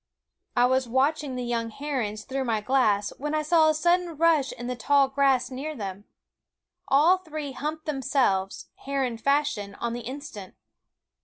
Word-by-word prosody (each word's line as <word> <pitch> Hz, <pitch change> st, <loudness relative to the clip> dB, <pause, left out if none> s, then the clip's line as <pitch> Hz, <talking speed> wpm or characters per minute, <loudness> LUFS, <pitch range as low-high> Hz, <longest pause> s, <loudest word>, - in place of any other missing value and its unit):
I 245 Hz, -, +5 dB
was 260 Hz, -1 st, +1 dB
watching 275 Hz, +2 st, +1 dB
the 250 Hz, -, -3 dB
young 235 Hz, -1 st, -2 dB
herons 225 Hz, -5 st, -3 dB
through 265 Hz, +2 st, -3 dB
my 225 Hz, -3 st, 0 dB
glass 210 Hz, -4 st, +1 dB
when 295 Hz, +2 st, -2 dB
I 305 Hz, -, 0 dB
saw 315 Hz, 0 st, +4 dB
a -, -, +3 dB
sudden 345 Hz, 0 st, +1 dB
rush 315 Hz, -4 st, +3 dB
in 240 Hz, -, -8 dB
the 250 Hz, +1 st, -3 dB
tall 275 Hz, +4 st, +3 dB
grass 270 Hz, -1 st, +2 dB
near 290 Hz, +4 st, -5 dB
them. 200 Hz, -3 st, -6 dB, 0.8 s
All 310 Hz, +7 st, +5 dB
three 310 Hz, -5 st, -6 dB
humped 305 Hz, +4 st, -5 dB
themselves, 255 Hz, -9 st, 0 dB, 0.2 s
heron 265 Hz, -4 st, -1 dB
fashion, 280 Hz, -7 st, 0 dB
on 235 Hz, -1 st, -3 dB
the 240 Hz, -, -4 dB
instant. 240 Hz, -6 st, -8 dB
270 Hz, 160 wpm, -26 LUFS, 235-300 Hz, 0.8 s, I